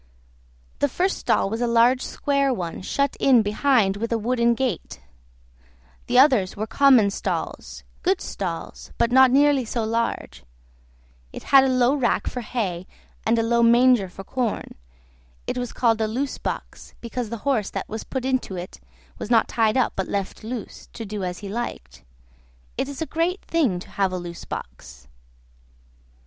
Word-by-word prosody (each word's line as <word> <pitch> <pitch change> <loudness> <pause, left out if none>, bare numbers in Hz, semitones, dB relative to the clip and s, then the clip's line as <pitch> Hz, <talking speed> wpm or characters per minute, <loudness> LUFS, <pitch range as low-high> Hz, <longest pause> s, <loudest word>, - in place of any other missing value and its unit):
The 285 - +2
first 370 +8 -1
stall - - +1
was 225 +4 -3
a 240 - +1
large 235 +2 +4
square 280 -1 0
one, 180 -9 -4
shut 280 +8 -1
in 250 -5 +5
behind 210 -2 +2
with 230 +3 -3
a 230 - +2
wooden 235 +1 +1
gate; 250 -8 -3 1.1
the 245 - +1
others 255 -9 +4
were 215 - -2
common 240 -3 +4
stalls, - - -4 0.2
good 380 +1 +1
stalls, 170 -4 -6
but 235 - +1
not 260 +1 +7
nearly 280 0 +4
so 230 0 -3
large; 230 +1 -2 0.9
it - - -9
had 270 -1 +9
a - - +2
low 255 0 +3
rack 265 -5 0
for 250 - -4
hay 195 -7 -3 0.4
and 230 +1 +3
a 225 - +2
low 235 +1 +2
manger 235 -3 +5
for 195 - -10
corn; 240 +1 -3 0.7
it - - -3
was 245 -1 -4
called 225 -2 +1
a 220 - +1
loose 255 +5 -3
box, - - -6
because 235 -1 -5
the 235 - -4
horse 240 -8 +1
that - - -5
was 220 +1 -6
put 260 -1 -4
into 260 -7 -1
it 180 +1 -8 0.4
was - - -5
not 230 -2 +4
tied 220 0 +1
up, 255 - +1
but 190 - -2
left 200 0 -3
loose, 230 0 -7
to 225 - -7
do 205 -1 -5
as 180 -1 -3
he - - -5
liked. 65 - -6 0.7
It 270 - -2
is 285 +3 -4
a - - -4
great 335 +5 -2
thing 285 - +1
to - - -12
have 195 -2 0
a 185 - -3
loose 175 -1 -8
box. - - -9
235 Hz, 175 wpm, -23 LUFS, 200-260 Hz, 1.1 s, had